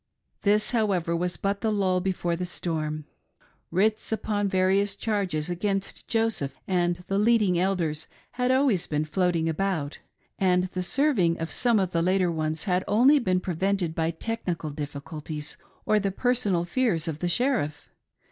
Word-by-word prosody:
This 210 +1 +2
however 195 -8 +1
was 175 +1 -2
but 200 0 -1
the 220 - +1
lull 190 -3 +1
before 180 -2 -1
the 180 - -4
storm. 155 -3 -3 0.6
Writs 215 +6 +1
upon 210 -2 0
various 195 +1 +2
charges 195 -9 -1
against 195 +2 -2
Joseph 225 -11 0
and 175 -1 0
the 195 +1 +1
leading 210 -5 +3
Elders 170 -5 -1 0.2
had 250 0 0
always 260 -8 +3
been 150 0 -1
floating 165 +1 +1
about, 160 -3 -1 0.4
and 180 -1 +3
the 185 - -2
serving 190 - +2
of 165 0 -4
some 240 -3 +2
of 190 -3 +1
the 165 - +1
later 185 0 +2
ones 155 -1 -2
had 185 -2 +1
only 255 +8 +5
been 185 -7 +1
prevented 185 -1 -1
by 160 0 0
technical 170 -3 -3
difficulties 150 +1 -6 0.3
or 215 - +3
the 200 -1 0
personal 205 -5 0
fears 180 -5 0
of 155 -2 -3
the 175 - -1
Sheriff. 175 - 0
185 Hz, 155 wpm, -26 LUFS, 165-210 Hz, 0.6 s, only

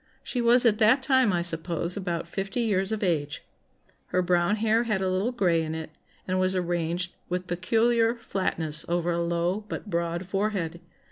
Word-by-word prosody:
She 245 - -2
was 240 +1 +5
at 215 -2 +4
that 240 +5 +4
time, 260 -5 +4
I 175 -1 0
suppose, 170 +1 +1
about 175 -4 -3
fifty 195 +6 -3
years 200 -3 0
of 220 -1 -2
age; 150 -6 -1 0.6
her 185 - 0
brown 175 +2 +2
hair 220 +1 +2
had 215 -4 0
a 190 - -1
little 190 +6 0
grey 180 -9 +1
in 160 0 -4
it, 160 -1 -6 0.4
and 185 0 0
was 185 0 +2
arranged 175 0 -1 0.2
with 180 +1 -2
peculiar 225 +6 +1
flatness 165 -8 -2
over 175 0 0
a 170 - -1
low 170 +4 -1
but 210 - -6
broad 170 +1 -2
forehead. 185 -3 -2
185 Hz, 180 wpm, -26 LUFS, 170-215 Hz, 0.6 s, was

